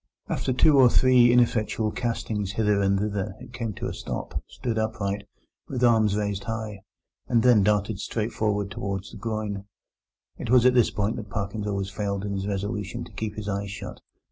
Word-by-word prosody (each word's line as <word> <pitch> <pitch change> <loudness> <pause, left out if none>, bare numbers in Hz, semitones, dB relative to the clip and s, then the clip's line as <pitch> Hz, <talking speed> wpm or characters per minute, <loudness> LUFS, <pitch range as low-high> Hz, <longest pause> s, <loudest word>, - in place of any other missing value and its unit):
After - - -1
two 140 +3 +5
or 125 -2 +8
three 125 -1 +5
ineffectual 115 -3 +2
castings 105 -5 -2
hither 105 -1 +2
and 100 0 +3
thither 105 0 -2
it 125 -1 -12
came 115 -2 -3
to - - -5
a - - -3
stop, - - -5
stood 115 -3 -3
upright, 105 -2 -2 0.4
with 125 -2 -3
arms 110 -4 +4
raised 100 -2 -2
high, 110 -3 -4 0.5
and 115 -2 +3
then 120 -4 +6
darted 105 0 +1
straight 110 +2 -2
forward 105 -2 -1
towards 100 -2 -4
the - - -9
groyne. 110 -3 -3 0.7
It - - -5
was 125 0 +5
at 125 - +6
this 120 -2 +4
point 105 +1 -1
that 105 -2 -7
Parkins 100 +1 -3
always 100 -1 -2
failed 100 0 -2
in 100 - -2
his 95 0 -3
resolution 100 +1 -3
to - - -11
keep 110 -1 -4
his 105 -1 -6
eyes 100 0 -2
shut. 100 - -7
105 Hz, 190 wpm, -26 LUFS, 100-115 Hz, 0.7 s, or